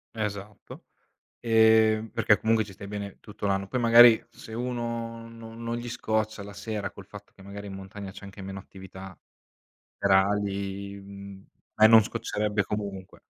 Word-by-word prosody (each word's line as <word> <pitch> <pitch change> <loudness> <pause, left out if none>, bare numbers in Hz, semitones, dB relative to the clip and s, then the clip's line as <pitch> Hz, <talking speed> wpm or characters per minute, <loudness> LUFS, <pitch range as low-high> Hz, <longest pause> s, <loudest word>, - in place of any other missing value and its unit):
Esatto. 105 -1 -6 0.6
Ehm, 110 -1 +4
perché 105 - +3
comunque 110 +1 +2
ci 100 - -12
stai 100 +1 -10
bene 100 -1 -6
tutto 105 -1 -6
l'anno, 95 0 0
poi 125 - -2
magari 115 0 +8
se 110 - -11
uno 115 -1 -4
no 115 -1 -11
non 115 0 -4
gli 120 0 -6
scoccia 110 -2 -2
la 105 +1 -10
sera, 105 -1 -4
col - - -12
fatto - - -13
che 95 - -16
magari 100 +1 -8
in 100 - -7
montagna 95 +1 -8
c'è 95 - -12
anche 100 0 -11
meno 95 0 -6
attività 95 -1 -12 0.8
serali, 100 0 0
mhmm, 100 0 -11 0.3
e 110 - +9
non 110 0 +8
scoccerebbe 105 0 -2
comunque. 100 -2 -6
105 Hz, 155 wpm, -27 LUFS, 100-110 Hz, 0.8 s, e